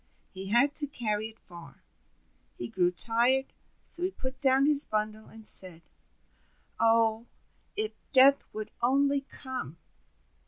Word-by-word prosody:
He 190 Hz, 0 st, -10 dB
had 240 Hz, +8 st, +1 dB
to 290 Hz, -, +6 dB
carry 220 Hz, -5 st, -5 dB
it 225 Hz, 0 st, -17 dB
far. 170 Hz, -1 st, -16 dB, 0.7 s
He 120 Hz, -, -7 dB
grew 180 Hz, -2 st, -1 dB
tired, 235 Hz, +8 st, +2 dB, 0.3 s
so 345 Hz, -, +2 dB
he 365 Hz, -, -2 dB
put 260 Hz, -7 st, -9 dB
down 270 Hz, 0 st, +3 dB
his 290 Hz, -1 st, +5 dB
bundle, 215 Hz, 0 st, -5 dB
and 220 Hz, -1 st, -12 dB
said: 175 Hz, -3 st, +5 dB, 1.0 s
"Oh, 225 Hz, 0 st, 0 dB, 0.5 s
if 430 Hz, +1 st, -3 dB, 0.2 s
Death 275 Hz, +1 st, +4 dB
would 215 Hz, 0 st, -9 dB
only 275 Hz, +3 st, 0 dB
come!" 260 Hz, -, -8 dB
235 Hz, 130 wpm, -26 LUFS, 215-275 Hz, 1.0 s, to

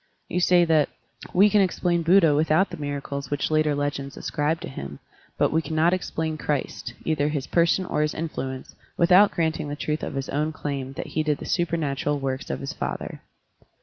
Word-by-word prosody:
You 180 Hz, -, -1 dB
say 175 Hz, -1 st, +5 dB
that, 155 Hz, -3 st, +3 dB, 0.4 s
"We 195 Hz, +3 st, +6 dB
can 210 Hz, 0 st, +4 dB
explain 175 Hz, -2 st, +1 dB
Buddha 165 Hz, -2 st, +5 dB
without 155 Hz, +6 st, +2 dB
the 175 Hz, -, -6 dB
miracles 140 Hz, -2 st, -4 dB
which 145 Hz, +1 st, -1 dB
later 155 Hz, -1 st, +2 dB
legends 140 Hz, -1 st, -3 dB
ascribe 155 Hz, +1 st, -1 dB
to -, -, -5 dB
him, 70 Hz, -, -7 dB, 0.4 s
but -, -, +2 dB
we 160 Hz, -, +2 dB
cannot 160 Hz, +2 st, +2 dB
explain 160 Hz, -4 st, -2 dB
Christ 145 Hz, -3 st, -3 dB
— -, -, -21 dB
either 150 Hz, -2 st, +1 dB
his 145 Hz, -3 st, -2 dB
person 170 Hz, +2 st, +2 dB
or 150 Hz, -, -1 dB
his 150 Hz, 0 st, 0 dB
influence 135 Hz, -5 st, -5 dB
— -, -, -30 dB
^without 185 Hz, +4 st, +6 dB
granting 160 Hz, -2 st, -1 dB
the 145 Hz, -, -3 dB
truth 150 Hz, +1 st, -2 dB
of -, -, -5 dB
his 135 Hz, -1 st, -3 dB
own 150 Hz, +3 st, -1 dB
claim 135 Hz, -3 st, -4 dB
that -, -, -5 dB
he 155 Hz, -, +1 dB
did 150 Hz, -2 st, 0 dB
the -, -, -8 dB
super 170 Hz, -1 st, 0 dB
natural 145 Hz, -1 st, -1 dB
works 135 Hz, 0 st, -3 dB
of -, -, -3 dB
his 140 Hz, -, -4 dB
father." -, -, -5 dB
155 Hz, 205 wpm, -25 LUFS, 145-170 Hz, 0.4 s, We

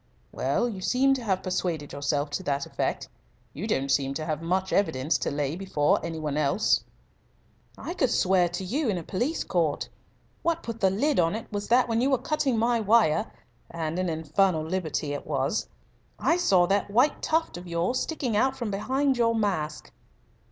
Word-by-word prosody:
"Well, 140 Hz, -, 0 dB
you 200 Hz, -6 st, -5 dB
seem 265 Hz, +7 st, +3 dB
to 260 Hz, -2 st, -3 dB
have 190 Hz, -4 st, 0 dB
persuaded 175 Hz, -5 st, -2 dB
yourself 145 Hz, +1 st, -1 dB
to 165 Hz, -, -2 dB
that 140 Hz, -5 st, -1 dB
effect. -, -, -2 dB, 0.5 s
You 190 Hz, +9 st, -5 dB
don't 135 Hz, -9 st, 0 dB
seem 135 Hz, 0 st, +1 dB
to 155 Hz, -, -3 dB
have 155 Hz, -1 st, -2 dB
much 185 Hz, +3 st, -1 dB
evidence 145 Hz, -7 st, +1 dB
to -, -, -1 dB
lay 145 Hz, +1 st, -2 dB
before 175 Hz, -6 st, +1 dB
any 165 Hz, -1 st, -4 dB
one 150 Hz, -2 st, -2 dB
else." 155 Hz, +8 st, +2 dB, 0.9 s
"I 345 Hz, -, -5 dB
could 265 Hz, -8 st, +1 dB
swear 185 Hz, -4 st, +3 dB
to 175 Hz, +2 st, -4 dB
you 260 Hz, +8 st, -1 dB
in 195 Hz, -, 0 dB
a 170 Hz, -, -5 dB
police 245 Hz, -, -1 dB
court. 165 Hz, -5 st, 0 dB, 0.5 s
What 335 Hz, 0 st, 0 dB
put 230 Hz, -1 st, -5 dB
the 190 Hz, -, +5 dB
lid 270 Hz, +8 st, +1 dB
on 165 Hz, +3 st, +2 dB
it 225 Hz, -, -5 dB
was 205 Hz, 0 st, -3 dB
that 250 Hz, +2 st, +4 dB
when 230 Hz, 0 st, +1 dB
you 265 Hz, -, +2 dB
were 265 Hz, -, +3 dB
cutting 265 Hz, -1 st, 0 dB
my 235 Hz, +1 st, +2 dB
wire 215 Hz, -3 st, +3 dB, 0.4 s
and 165 Hz, +1 st, -3 dB
an 185 Hz, -1 st, 0 dB
infernal 160 Hz, +2 st, +1 dB
liberty 160 Hz, -4 st, -2 dB
it 145 Hz, -, -6 dB
was! -, -, -1 dB, 0.5 s
I 335 Hz, -, +2 dB
saw 190 Hz, -, +4 dB
that 200 Hz, +2 st, 0 dB
white 245 Hz, +8 st, +2 dB
tuft 325 Hz, +1 st, 0 dB
of 175 Hz, +1 st, -8 dB
yours 170 Hz, +9 st, 0 dB
sticking 265 Hz, -8 st, -2 dB
out 265 Hz, +5 st, +2 dB
from 235 Hz, -5 st, -3 dB
behind 265 Hz, +6 st, 0 dB
your 230 Hz, -1 st, +3 dB
mask." 180 Hz, -9 st, -2 dB
190 Hz, 190 wpm, -27 LUFS, 155-235 Hz, 0.9 s, the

